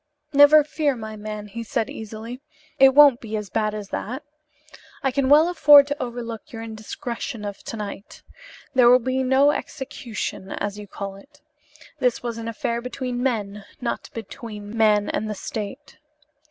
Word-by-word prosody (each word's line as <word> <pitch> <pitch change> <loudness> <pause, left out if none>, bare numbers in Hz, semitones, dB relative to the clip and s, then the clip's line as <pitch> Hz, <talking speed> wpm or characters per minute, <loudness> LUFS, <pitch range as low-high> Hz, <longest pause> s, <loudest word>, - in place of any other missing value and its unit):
"Never 290 +2 +8
fear, 295 -2 0
my 220 -2 -7
man," 210 0 -6
he 230 +3 -7
said 230 0 -1
easily, 220 +3 -8 0.4
"it 265 0 +7
won't 285 -4 +7
be 220 -1 -4
as 205 -3 -6
bad 215 -1 0
as 205 -2 -7
that. 255 +7 -4 0.8
I 270 - +2
can 265 0 0
well 305 +3 +7
afford 295 -5 +7
to 285 +1 -4
overlook 235 -2 -6
your 225 -1 -7
indiscretion 230 +1 -6
of 205 -1 -6
to 225 - -5
night. 205 -1 -8 0.5
There 250 -3 +6
will 250 - +8
be 255 +1 -1
no 265 +3 +4
execution, 240 -9 -5
as 205 0 -4
you 205 - -9
call 195 0 -6
it. 290 +8 -19 0.6
This 250 -3 +1
was 235 -1 -4
an 225 - -6
affair 235 +1 -2
between 250 0 -4
men 210 -5 -2 0.2
not 240 -2 -4
between 220 -1 -8
man 210 -2 +3
and 215 - -2
the 210 - -3
state. 220 +10 -7
235 Hz, 165 wpm, -23 LUFS, 215-265 Hz, 0.8 s, Never